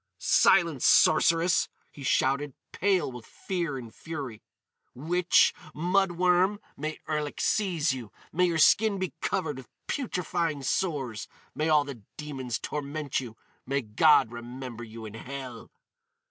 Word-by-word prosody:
"Silence, 170 Hz, -8 st, +4 dB
sorceress!" 165 Hz, +2 st, +4 dB, 0.2 s
he 145 Hz, -, -13 dB
shouted, 140 Hz, +1 st, +1 dB, 0.2 s
pale 185 Hz, -7 st, +1 dB
with 125 Hz, -2 st, -9 dB
fear 170 Hz, 0 st, -4 dB
and 115 Hz, -3 st, -9 dB
fury. 140 Hz, -9 st, -7 dB, 0.5 s
"Witch! 175 Hz, +7 st, +3 dB, 0.2 s
Mud 180 Hz, +3 st, +2 dB
worm! 180 Hz, +3 st, +2 dB, 0.2 s
May 155 Hz, +2 st, -4 dB
Erlik 150 Hz, -1 st, -2 dB
seize 170 Hz, -9 st, +1 dB
you! 120 Hz, -6 st, -7 dB, 0.2 s
May 180 Hz, +2 st, +3 dB
your 170 Hz, -2 st, 0 dB
skin 205 Hz, +6 st, +5 dB
be 185 Hz, -1 st, -3 dB
covered 160 Hz, -8 st, -1 dB
with 130 Hz, -3 st, -11 dB, 0.2 s
putrefying 170 Hz, -, -2 dB
sores! 135 Hz, -, -2 dB, 0.3 s
May 155 Hz, +1 st, -1 dB
all 150 Hz, -2 st, +5 dB
the 140 Hz, -6 st, -8 dB, 0.2 s
demons 135 Hz, -6 st, -4 dB
torment 145 Hz, +2 st, -3 dB
you! 115 Hz, -4 st, -8 dB, 0.3 s
May 140 Hz, +1 st, 0 dB
God 110 Hz, +2 st, +4 dB
remember 120 Hz, 0 st, -7 dB
you 115 Hz, 0 st, -9 dB
in 105 Hz, -, -8 dB
hell!" 125 Hz, 0 st, -8 dB
150 Hz, 130 wpm, -28 LUFS, 130-175 Hz, 0.5 s, skin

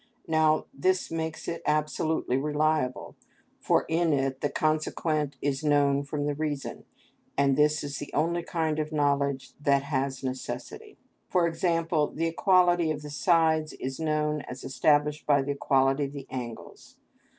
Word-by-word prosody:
Now 155 Hz, -1 st, +3 dB
this 185 Hz, -2 st, 0 dB
makes 160 Hz, -1 st, -4 dB
it 170 Hz, -, -3 dB
absolutely 155 Hz, -2 st, 0 dB
reliable, 150 Hz, -1 st, 0 dB, 0.4 s
for -, -, +2 dB
in 165 Hz, -1 st, +2 dB
it 135 Hz, -1 st, -1 dB
the 145 Hz, -, 0 dB
consequent 155 Hz, -1 st, -1 dB
is 140 Hz, 0 st, -1 dB
known 145 Hz, -2 st, +3 dB
from 145 Hz, +1 st, -3 dB
the 145 Hz, -, 0 dB
reason, 145 Hz, -1 st, -4 dB, 0.5 s
and 140 Hz, -1 st, +3 dB
this 150 Hz, +1 st, +2 dB
is 140 Hz, -1 st, -5 dB
the 145 Hz, -, -7 dB
only 170 Hz, +3 st, 0 dB
kind 160 Hz, -2 st, -1 dB
of 155 Hz, 0 st, -2 dB
knowledge 140 Hz, -3 st, 0 dB
that 140 Hz, -1 st, +3 dB
has 135 Hz, -2 st, -2 dB
necessity; 130 Hz, 0 st, -6 dB, 0.3 s
for 180 Hz, -2 st, +3 dB
example, 165 Hz, -2 st, +1 dB
the 165 Hz, -, -3 dB
equality 175 Hz, 0 st, +3 dB
of 150 Hz, -1 st, -3 dB
the 150 Hz, -, -7 dB
sides 160 Hz, -1 st, +2 dB
is 135 Hz, +2 st, -5 dB
known 155 Hz, -1 st, 0 dB
as 125 Hz, +1 st, -8 dB
established 150 Hz, +2 st, +1 dB
by 145 Hz, -2 st, +4 dB
the 145 Hz, -, -2 dB
equality 135 Hz, 0 st, +2 dB
of 140 Hz, -, -7 dB
the 140 Hz, -2 st, -7 dB
angles. 120 Hz, -3 st, -8 dB
150 Hz, 150 wpm, -27 LUFS, 140-160 Hz, 0.5 s, by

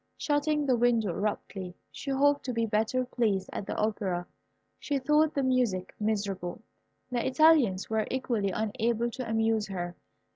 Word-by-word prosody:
Shutting 295 Hz, 0 st, +1 dB
the 260 Hz, -3 st, +3 dB
window 230 Hz, -4 st, +2 dB
abruptly, 190 Hz, -1 st, -3 dB, 0.2 s
she 280 Hz, -, -7 dB
hoped 285 Hz, +1 st, +3 dB
to 250 Hz, -, -2 dB
be 230 Hz, 0 st, +1 dB
better 225 Hz, +4 st, 0 dB
pleased 215 Hz, -6 st, 0 dB
at 195 Hz, -, -5 dB
the -, -, -3 dB
Opera. 200 Hz, -5 st, -1 dB, 0.5 s
She 285 Hz, -, -1 dB
thought 300 Hz, +3 st, +2 dB
the 280 Hz, -, +1 dB
music 245 Hz, -8 st, +1 dB
miserable. 200 Hz, -2 st, -2 dB, 0.5 s
The 240 Hz, -1 st, 0 dB
Italians 260 Hz, -9 st, +4 dB
were 220 Hz, -1 st, 0 dB
equally 235 Hz, -6 st, -1 dB
unable 225 Hz, +4 st, -1 dB
to 250 Hz, -1 st, -5 dB
amuse 225 Hz, -1 st, +1 dB
her. 175 Hz, -2 st, -4 dB
225 Hz, 150 wpm, -29 LUFS, 205-260 Hz, 0.5 s, Italians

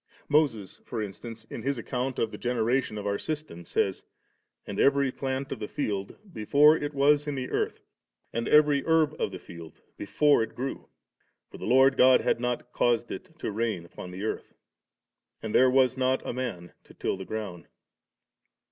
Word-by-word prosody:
Moses, 135 Hz, -10 st, +1 dB
for 120 Hz, -, -5 dB
instance, 110 Hz, +2 st, -7 dB
in -, -, -5 dB
his 135 Hz, +3 st, -1 dB
account 125 Hz, +2 st, -3 dB
of 110 Hz, -, 0 dB
the -, -, -7 dB
generation 120 Hz, -1 st, 0 dB
of 105 Hz, -, -5 dB
our 100 Hz, 0 st, -1 dB
system, 150 Hz, -, -5 dB
says, 95 Hz, -, -1 dB, 0.6 s
*And 100 Hz, -, -5 dB
every 140 Hz, -1 st, +3 dB
plant 135 Hz, +1 st, -3 dB
of 135 Hz, -, -4 dB
the 105 Hz, -, -4 dB
field, 100 Hz, -8 st, -3 dB, 0.2 s
before 145 Hz, +8 st, +5 dB
it 145 Hz, -2 st, -4 dB
was 145 Hz, +1 st, +3 dB
in 145 Hz, -, -2 dB
the 130 Hz, -1 st, -4 dB
earth, -, -, -1 dB, 0.5 s
and 115 Hz, +1 st, -2 dB
every 150 Hz, -2 st, +5 dB
herb 160 Hz, -2 st, +3 dB
of -, -, 0 dB
the 95 Hz, -, -6 dB
field 85 Hz, -2 st, -12 dB, 0.2 s
before 145 Hz, +6 st, +3 dB
it 115 Hz, -, -4 dB
grew; 135 Hz, +2 st, -5 dB, 0.6 s
for -, -, -11 dB
the -, -, -6 dB
Lord 130 Hz, +3 st, +5 dB
God 130 Hz, 0 st, +6 dB
had -, -, +1 dB
not 125 Hz, 0 st, -3 dB
caused 120 Hz, -1 st, +1 dB
it 170 Hz, -3 st, -8 dB
to 110 Hz, -, -4 dB
rain 105 Hz, -5 st, -2 dB
upon 90 Hz, -, -10 dB
the 90 Hz, +3 st, -7 dB
earth, 110 Hz, -, -4 dB, 0.8 s
and 110 Hz, -, -5 dB
there 130 Hz, 0 st, +6 dB
was 130 Hz, 0 st, +3 dB
not 130 Hz, 0 st, 0 dB
a -, -, -2 dB
man 115 Hz, -9 st, -5 dB
to -, -, -17 dB
till -, -, -2 dB
the 95 Hz, -, -7 dB
ground*.' 100 Hz, -4 st, -6 dB
125 Hz, 185 wpm, -27 LUFS, 105-140 Hz, 0.8 s, God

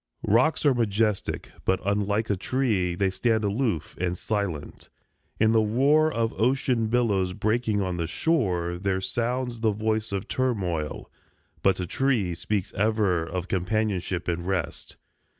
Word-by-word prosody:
Rocks 125 Hz, +10 st, +3 dB
are 140 Hz, -, +6 dB
majestic; 110 Hz, -3 st, 0 dB
but, 95 Hz, -1 st, +1 dB
unlike 105 Hz, +2 st, 0 dB
a -, -, +2 dB
tree, 95 Hz, -4 st, 0 dB
They 95 Hz, +1 st, +1 dB
stand 110 Hz, +2 st, +1 dB
aloof, 105 Hz, -, -1 dB
and 90 Hz, 0 st, -1 dB
silent. 100 Hz, -9 st, -3 dB, 0.5 s
In 110 Hz, 0 st, +4 dB
the 115 Hz, -1 st, +4 dB
roar 140 Hz, +8 st, +3 dB
Of 115 Hz, -3 st, -1 dB
ocean 125 Hz, -2 st, +2 dB
billows 105 Hz, -6 st, +1 dB
breaking 110 Hz, 0 st, 0 dB
on 90 Hz, -2 st, -2 dB
the 85 Hz, -1 st, -1 dB
shore 90 Hz, -, 0 dB
There 95 Hz, 0 st, 0 dB
sounds 120 Hz, +4 st, -2 dB
the 110 Hz, -1 st, +2 dB
voice 110 Hz, +1 st, -1 dB
of 100 Hz, 0 st, -3 dB
turmoil. 95 Hz, -12 st, -2 dB, 0.5 s
But 95 Hz, -1 st, +3 dB
a 90 Hz, -, -1 dB
tree 110 Hz, -3 st, 0 dB
Speaks 95 Hz, +3 st, -2 dB
ever 105 Hz, -5 st, +1 dB
of 90 Hz, +2 st, -4 dB
companionship 95 Hz, -2 st, -1 dB
and 85 Hz, 0 st, -2 dB
rest. 95 Hz, -5 st, -3 dB
105 Hz, 145 wpm, -26 LUFS, 90-115 Hz, 0.5 s, are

